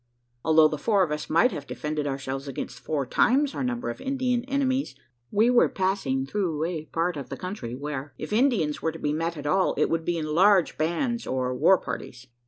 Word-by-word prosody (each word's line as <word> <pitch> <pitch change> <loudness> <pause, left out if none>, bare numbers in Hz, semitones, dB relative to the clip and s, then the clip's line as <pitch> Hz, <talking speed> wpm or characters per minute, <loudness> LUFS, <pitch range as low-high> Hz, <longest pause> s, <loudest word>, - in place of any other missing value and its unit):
Although 160 -1 +5
the 150 - -4
four 200 +2 +3
of 165 - -2
us 150 0 -4
might 205 +11 +4
have 140 - -6
defended 150 -1 -3
ourselves 135 0 -4
against 125 -2 -6
four 140 +1 -2
times 270 - +2
our - - -3
number 245 -1 -2
of - - -10
Indian 260 -2 0
enemies, 270 - 0 0.3
we 225 +4 +3
were 245 - +5
passing 185 -9 -1
through 165 -2 -1
apart 165 0 -2
of 135 -3 -7
the - - -5
country, 180 - -5
where, 140 0 -5
if 155 - -5
Indians 215 - +2
were 160 - 0
to 165 - -9
be 150 -2 -1
met 165 +1 -2
at 145 - -7
all, 185 +6 +2
it - - +2
would 165 0 0
be 175 +1 -1
in 160 - -2
large 190 +1 +4
bands 205 - -1
or 130 -1 -1
"war 185 +9 +5
parties." 125 -6 -7
165 Hz, 205 wpm, -26 LUFS, 145-215 Hz, 0.3 s, Although